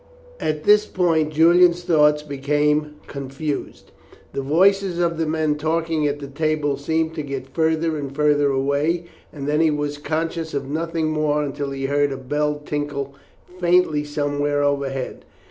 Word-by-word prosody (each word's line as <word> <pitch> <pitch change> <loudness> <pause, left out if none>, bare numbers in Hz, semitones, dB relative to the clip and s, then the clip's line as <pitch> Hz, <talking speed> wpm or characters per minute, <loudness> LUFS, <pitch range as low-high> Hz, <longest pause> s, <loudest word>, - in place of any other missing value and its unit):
At 150 0 -2
this 210 0 +5
point 165 -4 +1
Julian's 170 +2 +5
thoughts 150 -3 +3
became 150 +1 0
confused. 140 +2 -5 0.4
The - - -2
voices 185 +5 +2
of 170 -2 0
the 160 - 0
men 155 -1 0
talking 160 0 0
at 145 0 -1
the 145 - -7
table 150 0 -1
seemed 160 +3 -1
to 155 - -4
get 135 -2 -6
further 160 0 +1
and 140 -2 -5
further 145 -1 +3
away, 140 +5 0 0.3
and 140 -2 -6
then 150 +2 +2
he 160 - +4
was 145 -1 -2
conscious 160 +1 -3
of 140 -1 -3
nothing 160 +1 -2
more 150 -1 +1
until 140 0 -3
he 135 0 -4
heard 145 +1 +1
a 135 - -4
bell 150 +2 -2
tinkle 145 -2 -3 0.5
faintly 175 -4 +3
somewhere 145 0 -1
overhead. 140 -2 -2
150 Hz, 155 wpm, -22 LUFS, 145-160 Hz, 0.5 s, this